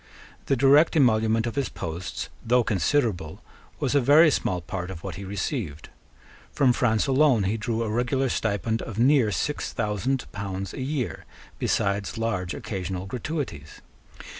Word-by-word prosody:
The 135 - +3
direct 140 +6 +5
emolument 110 -5 +3
of 115 - -3
his 140 -2 -1
posts, 85 +3 -5
though 125 +1 +3
considerable, 100 - 0 0.4
was - - 0
a 140 - +4
very 150 +5 +6
small 90 -8 0
part 90 +1 -5
of 85 -3 -8
what 95 -3 -5
he 95 +5 -7
received. 95 - -4 0.6
From 130 -3 +3
France 110 -4 +1
alone 135 -5 +3
he 100 +3 0
drew 115 +1 -2
a - - -2
regular 125 +4 0
stipend 115 -1 -1
of 110 - -7
near 125 -2 +4
six 145 - -2
thousand 110 +5 -1
pounds 95 -2 -5
a - - -6
year, 135 -2 -3 0.3
besides 100 +1 0
large 100 -6 -2
occasional 95 -2 -4
gratuities. 120 - -5
110 Hz, 150 wpm, -25 LUFS, 95-130 Hz, 0.6 s, very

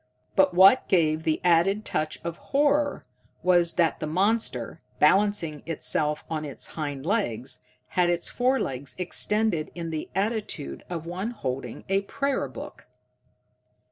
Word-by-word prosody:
But 190 -2 +4
what 195 +7 +7
gave 160 -4 +2
the 160 -1 0
added 180 +5 +3
touch 155 0 -2
of 170 -1 -4
horror 290 +1 +1 0.4
was 175 -2 +4
that 170 -2 +1
the 155 - -3
monster, 185 - 0 0.2
balancing 165 -3 +3
itself 150 -1 0
on 155 -1 -3
its 145 -3 -7
hind 145 -3 -5
legs, 135 - -1 0.3
had 180 -1 +2
its 175 0 0
forelegs 245 - -1
extended 185 -1 0
in 165 -2 -4
the 155 -1 -4
attitude 205 - -2
of 165 -2 -4
one 185 +6 -3
holding 130 - -5
a 195 +1 +2
prayer 275 +7 -1
book! - - -10
175 Hz, 135 wpm, -26 LUFS, 155-205 Hz, 0.4 s, what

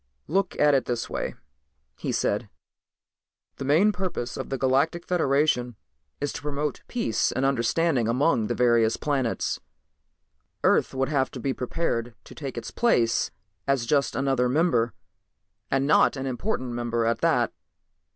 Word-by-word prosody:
"Look 195 +3 0
at 150 0 +5
it 135 -3 +2
this 120 -2 -3
way," - - -3 0.6
he - - -3
said. - - 0 1.1
"The 135 - -5
main 165 +10 +4
purpose 180 - -3
of - - -5
the 135 - -2
Galactic 140 +7 +1
Federation 140 -7 +1 0.4
is 145 0 -2
to - - -6
promote 145 -1 -3
peace 170 - 0
and 130 - 0
understanding 135 0 +1
among 120 -2 +2
the - - -1
various 115 -2 +3
planets. 135 -5 -1 1.0
Earth - - +3
would 135 +1 0
have 135 -3 +1
to 130 - -8
be 135 +2 -1
prepared 120 -4 -2
to - - -13
take 135 -5 -6
its 115 - -5
place 120 - +2 0.4
as 135 -4 +1
just 140 +2 +1
another 135 -2 +1
member, 125 - +2 0.7
and 135 0 +1
not 150 - +4
an 135 - -3
important 130 - -2
member 120 -1 -1
at 115 0 +1
that. - - +2
135 Hz, 150 wpm, -26 LUFS, 120-150 Hz, 1.1 s, at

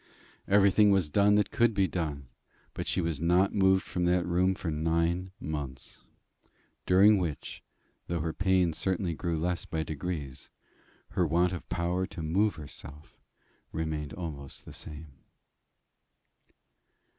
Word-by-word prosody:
Everything 100 +1 +5
was 95 -6 +2
done 105 +4 +4
that 105 -1 +2
could 115 -2 +2
be 95 -1 +3
done; 75 -7 -4 0.5
but - - -5
she 95 - +1
was 80 -3 -2
not 90 +3 +3
moved 95 -1 +4
from 90 -1 -2
that 90 0 +2
room 90 +2 +2
for 85 -3 -4
nine 85 +4 0
months, 70 -4 -6 0.8
during 100 +3 +6
which, 85 -5 -4 0.5
though 85 0 -1
her 80 +1 -2
pain 95 -3 +2
certainly 95 0 -1
grew 85 +1 -2
less 90 +2 -1
by 80 -1 -2
degrees, 75 -4 -5 0.6
her 90 - +1
want 85 +3 +2
of 90 - -7
power 90 +2 -1
to 80 - -7
move 100 +7 +1
herself 75 -1 -11 0.5
remained 80 -2 -3
almost 75 -6 -7
the - - -10
same. 75 -3 -10
85 Hz, 135 wpm, -29 LUFS, 80-95 Hz, 0.8 s, during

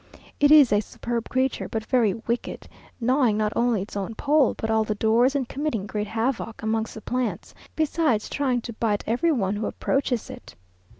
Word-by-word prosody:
It 290 - +5
is 290 -7 +7
a 205 - +4
superb 235 +2 -5
creature 260 0 -1
but 220 -1 -3
very 230 -7 +2
wicked, 235 +1 -4 0.3
gnawing 250 -2 +2
not 215 0 0
only 235 -5 +1
its 205 - -11
own 200 +3 -4
pole, 290 -1 +2
but 220 - -2
all 220 0 +3
the 215 0 -2
doors, 230 +6 +3
and 265 -3 0
committing 265 -9 -2
great 210 +1 -3
havoc 225 0 -2
amongst 220 0 -1
the 220 - -8
plants, 250 +2 -3 0.2
besides 310 -8 +1
trying 260 -4 0
to 235 - -7
bite 215 -2 -1
every 255 +9 +1
one 205 -7 0
who 210 - -2
approaches 265 -4 -1
it. - - -12
230 Hz, 185 wpm, -24 LUFS, 220-260 Hz, 0.3 s, is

